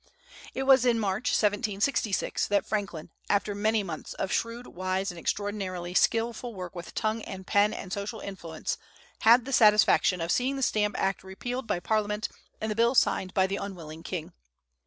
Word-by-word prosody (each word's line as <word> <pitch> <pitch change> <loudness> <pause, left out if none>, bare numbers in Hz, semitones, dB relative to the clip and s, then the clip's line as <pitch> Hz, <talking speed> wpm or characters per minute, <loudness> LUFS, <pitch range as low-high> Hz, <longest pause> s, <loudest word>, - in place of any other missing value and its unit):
It 265 - -1
was 265 -2 +6
in 240 -2 +3
March, 200 +2 0
1766, 205 +1 +1
that 200 -1 +1
Franklin, 195 -7 -3 0.2
after 205 0 +1
many 215 +1 +1
months 170 -5 -6
of 190 - -3
shrewd, 230 +1 -2
wise, 185 +1 -2
and 175 - -10
extraordinarily 185 -2 -3
skilful 230 +3 +1
work 180 -2 -6
with 175 -2 -9
tongue 220 +1 0
and 190 -2 -8
pen 205 +2 +3
and 190 -3 -6
social 205 +3 -4
influence, 170 -5 -5 0.4
had 235 +2 +6
the 275 - -4
satisfaction 210 -4 +5
of 165 +1 -1
seeing 260 +2 +1
the 270 - -2
Stamp 210 -4 +1
Act 195 0 0
repealed 245 +6 -5
by - - 0
Parliament 210 +2 0 0.3
and 220 0 -2
the - - -2
bill 235 +3 +3
signed 185 -6 +2
by 190 - +4
the 195 +1 -2
unwilling 165 -5 -7
king. 165 -2 -5
205 Hz, 175 wpm, -28 LUFS, 185-225 Hz, 0.4 s, was